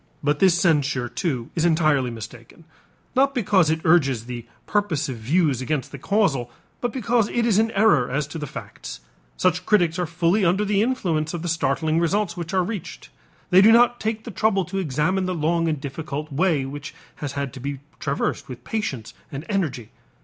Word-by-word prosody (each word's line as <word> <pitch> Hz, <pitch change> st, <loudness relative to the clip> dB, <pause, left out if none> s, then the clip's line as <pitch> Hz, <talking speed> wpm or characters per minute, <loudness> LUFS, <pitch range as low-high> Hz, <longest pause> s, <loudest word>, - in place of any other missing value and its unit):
But 145 Hz, 0 st, +1 dB
this 180 Hz, -3 st, +4 dB
censure 145 Hz, -8 st, +2 dB
too 125 Hz, -6 st, -3 dB
is 165 Hz, -, -1 dB
entirely 155 Hz, -6 st, +3 dB
mistaken, 115 Hz, +6 st, -10 dB, 0.5 s
not 275 Hz, +2 st, +3 dB
because 195 Hz, -8 st, +3 dB
it 160 Hz, 0 st, 0 dB
urges 135 Hz, -9 st, +3 dB
the 120 Hz, -1 st, -7 dB, 0.2 s
purposive 160 Hz, -, -1 dB
views 140 Hz, +2 st, +1 dB
against 135 Hz, 0 st, -2 dB
the 140 Hz, -, -8 dB
causal 155 Hz, -, +1 dB, 0.3 s
but 245 Hz, -, -1 dB
because 235 Hz, -3 st, +1 dB
it 235 Hz, -1 st, 0 dB
is 215 Hz, -3 st, +3 dB
in 225 Hz, +1 st, +2 dB
error 195 Hz, -, +3 dB
as 140 Hz, +3 st, -1 dB
to 160 Hz, -, -6 dB
the 150 Hz, -, -4 dB
facts. -, -, -8 dB, 0.4 s
Such 185 Hz, -, +1 dB
critics 175 Hz, -5 st, +2 dB
are 175 Hz, -, 0 dB
fully 175 Hz, +5 st, +1 dB
under 190 Hz, +4 st, +2 dB
the 205 Hz, 0 st, +2 dB
influence 175 Hz, -10 st, 0 dB
of 170 Hz, -, -5 dB
the -, -, -3 dB
startling 160 Hz, -1 st, +1 dB
results 195 Hz, +5 st, 0 dB
which 170 Hz, -2 st, -5 dB
are 185 Hz, -1 st, +2 dB
reached; 175 Hz, -, -6 dB, 0.4 s
they 185 Hz, +1 st, +8 dB
do 215 Hz, +3 st, +7 dB
not 240 Hz, +1 st, +5 dB
take 220 Hz, 0 st, -2 dB
the 235 Hz, -, -7 dB
trouble 195 Hz, -1 st, +1 dB
to 195 Hz, +3 st, -3 dB
examine 185 Hz, +4 st, 0 dB
the 185 Hz, -, -1 dB
long 165 Hz, +1 st, +1 dB
and 155 Hz, -3 st, -1 dB
difficult 145 Hz, +1 st, -5 dB
way 155 Hz, -2 st, +2 dB
which 140 Hz, +1 st, -7 dB, 0.2 s
has 145 Hz, -2 st, -5 dB
had 140 Hz, -3 st, -3 dB
to 135 Hz, -, -8 dB
be 140 Hz, +1 st, -4 dB, 0.2 s
traversed 140 Hz, -3 st, -2 dB
with 125 Hz, -2 st, -9 dB
patience 170 Hz, -, -4 dB, 0.2 s
and 140 Hz, +3 st, -6 dB
energy. 155 Hz, -, -2 dB
165 Hz, 190 wpm, -23 LUFS, 140-195 Hz, 0.5 s, they